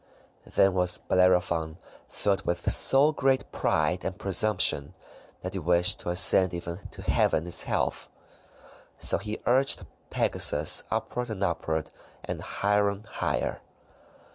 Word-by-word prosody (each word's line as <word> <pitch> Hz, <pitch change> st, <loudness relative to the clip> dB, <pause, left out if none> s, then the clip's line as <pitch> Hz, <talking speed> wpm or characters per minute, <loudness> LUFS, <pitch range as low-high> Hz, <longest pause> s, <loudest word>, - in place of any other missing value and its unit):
Then 95 Hz, -1 st, +4 dB
was 90 Hz, -1 st, +2 dB
Bellerophon 90 Hz, -3 st, +1 dB, 0.3 s
filled 100 Hz, -2 st, -1 dB
with 85 Hz, -2 st, -1 dB
so 140 Hz, +3 st, +5 dB
great 135 Hz, -3 st, -1 dB
pride 80 Hz, +4 st, -1 dB
and 95 Hz, 0 st, -5 dB
presumption 95 Hz, -7 st, +1 dB, 0.5 s
that 90 Hz, -, -5 dB
he 95 Hz, -, -3 dB
wished 90 Hz, +1 st, +2 dB
to -, -, -6 dB
ascend 90 Hz, 0 st, +4 dB
even 85 Hz, 0 st, -6 dB
to -, -, -12 dB
Heaven 80 Hz, -, +1 dB
itself. 85 Hz, -, -2 dB, 0.9 s
So -, -, -1 dB
he 105 Hz, 0 st, -5 dB
urged 130 Hz, +3 st, +2 dB, 0.2 s
Pegasus 75 Hz, +1 st, +2 dB
upward 125 Hz, -1 st, -4 dB
and 100 Hz, -3 st, -4 dB
upward, 80 Hz, -3 st, -3 dB, 0.3 s
and -, -, -5 dB
higher 105 Hz, 0 st, 0 dB
and 100 Hz, +2 st, -8 dB
higher. 75 Hz, -, -3 dB
90 Hz, 125 wpm, -26 LUFS, 85-105 Hz, 0.9 s, so